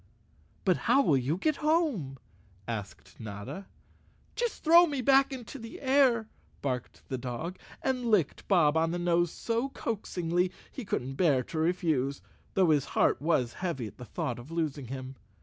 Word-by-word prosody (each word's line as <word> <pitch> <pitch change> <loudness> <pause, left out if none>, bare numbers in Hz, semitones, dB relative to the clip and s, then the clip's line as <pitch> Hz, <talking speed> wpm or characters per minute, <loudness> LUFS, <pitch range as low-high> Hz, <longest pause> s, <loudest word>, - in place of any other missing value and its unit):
"But - - +4
how 275 - +6
will 150 - +4
you 135 +6 0
get 310 +8 +1
home?" 300 - +1 0.5
asked 110 -4 -6
Notta. 105 - -7 0.7
"Just 480 -1 -2
throw 340 +2 +7
me 285 -3 -2
back 270 +2 +4
into 265 +1 -7
the 230 0 -9
air," 260 -5 +3 0.4
barked 125 -3 -3
the 130 - -3
dog, 130 +9 -5 0.2
and 255 -2 0
licked 205 -10 +1
Bob 165 -6 +4
on 160 0 +2
the 175 - -2
nose 175 -1 +2
so 235 +4 -1
coaxingly 180 -7 -1 0.2
he 260 - -7
couldn't 135 -6 -3
bear 145 -8 +3
to 160 - -5
refuse, 155 -5 +1 0.4
though 185 -4 +4
his 145 -2 +3
heart - - +3
was 140 -6 +1
heavy 170 -10 -2
at 105 - -10
the 125 - -7
thought 120 0 -3
of 120 +5 -11
losing 155 -5 -2
him. 130 +1 -7
170 Hz, 165 wpm, -29 LUFS, -, 0.7 s, throw